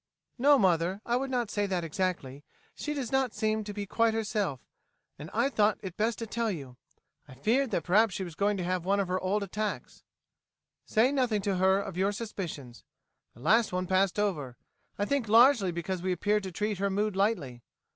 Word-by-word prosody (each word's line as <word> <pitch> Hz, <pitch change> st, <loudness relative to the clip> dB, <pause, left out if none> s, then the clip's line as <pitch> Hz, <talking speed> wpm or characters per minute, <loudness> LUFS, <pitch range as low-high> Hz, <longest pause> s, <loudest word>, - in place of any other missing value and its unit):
"No, 285 Hz, +3 st, +6 dB
mother, 185 Hz, -2 st, +2 dB
I 240 Hz, -, +1 dB
would 270 Hz, +2 st, -1 dB
not 240 Hz, -5 st, -1 dB
say 205 Hz, -1 st, 0 dB
that 185 Hz, -3 st, -1 dB
exactly. 165 Hz, -5 st, -2 dB
Yet 145 Hz, -, -19 dB, 0.3 s
she 300 Hz, -, -4 dB
does 260 Hz, -5 st, -4 dB
not 265 Hz, -3 st, +1 dB
seem 215 Hz, 0 st, 0 dB
to 205 Hz, -, -5 dB
be 205 Hz, 0 st, -5 dB
quite 225 Hz, +3 st, +1 dB
herself, 210 Hz, -, -1 dB, 0.6 s
and 150 Hz, +2 st, -8 dB
I 235 Hz, +4 st, +2 dB
thought 215 Hz, -6 st, +2 dB
it 185 Hz, -3 st, -6 dB
best 220 Hz, +1 st, 0 dB
to 230 Hz, -, -4 dB
tell 230 Hz, +1 st, -2 dB
you. 140 Hz, -10 st, -6 dB, 0.5 s
I 130 Hz, -, -13 dB
feared 235 Hz, -, +1 dB
that 185 Hz, -6 st, -1 dB
perhaps 205 Hz, +2 st, +3 dB
she 190 Hz, -, -3 dB
was 175 Hz, -3 st, -7 dB
going 205 Hz, +4 st, 0 dB
to 180 Hz, -, -3 dB
have 180 Hz, 0 st, -1 dB
one 200 Hz, +2 st, +1 dB
of 195 Hz, -, 0 dB
her 185 Hz, +1 st, 0 dB
old 200 Hz, +3 st, 0 dB
attacks." 210 Hz, +2 st, -4 dB, 0.9 s
"Say 235 Hz, +5 st, +3 dB
nothing 245 Hz, -7 st, 0 dB
to 195 Hz, -2 st, 0 dB
her 190 Hz, +1 st, +3 dB
of 195 Hz, -3 st, -6 dB
your 195 Hz, +2 st, +1 dB
suspicions. 170 Hz, -, -6 dB, 0.5 s
The 120 Hz, -, -15 dB
last 220 Hz, -, +3 dB
one 185 Hz, 0 st, -1 dB
passed 190 Hz, +1 st, +1 dB
over, 150 Hz, -12 st, -2 dB, 0.4 s
I 205 Hz, -, 0 dB
think 270 Hz, 0 st, -1 dB
largely 230 Hz, -4 st, +6 dB
because 170 Hz, +2 st, -4 dB
we 185 Hz, +1 st, -1 dB
appeared 210 Hz, +4 st, +1 dB
to 190 Hz, -1 st, -6 dB
treat 210 Hz, +2 st, -2 dB
her 200 Hz, 0 st, +1 dB
mood 205 Hz, +1 st, -1 dB
lightly. 180 Hz, -, 0 dB
200 Hz, 205 wpm, -29 LUFS, 180-220 Hz, 0.9 s, No